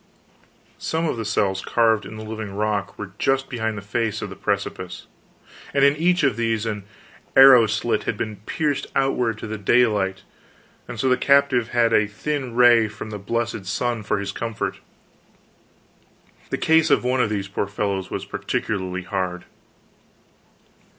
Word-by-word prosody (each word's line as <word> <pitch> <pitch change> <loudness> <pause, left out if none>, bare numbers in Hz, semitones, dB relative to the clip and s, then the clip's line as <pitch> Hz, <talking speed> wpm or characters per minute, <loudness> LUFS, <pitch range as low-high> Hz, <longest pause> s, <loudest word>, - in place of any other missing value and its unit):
Some 160 +1 -1
of - - -1
the 115 - -4
cells 95 -2 0
carved 110 -3 +2
in 110 - -9
the 110 - -7
living 110 -2 -6
rock 105 -1 -2
were 105 -2 -7
just 135 0 +1
behind 110 -4 -2
the 100 - -7
face 110 0 -2
of 105 - -6
the - - -8
precipice, 100 -2 -3 0.7
and 140 0 +5
in 140 +1 +4
each 175 +2 +2
of 135 -6 +2
these 115 -2 0
an 105 -3 -4 0.5
arrow 135 -4 +9
slit 110 +1 -1
had 105 - -2
been 110 -1 -4
pierced 150 -3 -1
outward 125 -5 +1
to - - -7
the 110 -1 -5
daylight, 105 -3 +2 0.6
and 125 -2 -7
so 130 - +1
the 125 -1 +3
captive 140 -4 +3
had 115 -1 +2
a 105 -1 +4
thin 130 +3 -4
ray 120 -2 +6
from 110 +1 -8
the 105 - -5
blessed 115 -1 -3
sun 120 +2 -1
for 105 - -1
his 100 0 -3
comfort. 115 +1 -4 1.7
The - - -1
case 160 0 +3
of - - +3
one 125 +1 +1
of 110 - +1
these 100 -2 -2
poor 100 0 -2
fellows 100 -2 -2
was - - -4
particularly 95 -3 -3
hard. 90 -1 -3
110 Hz, 165 wpm, -23 LUFS, 100-125 Hz, 1.7 s, arrow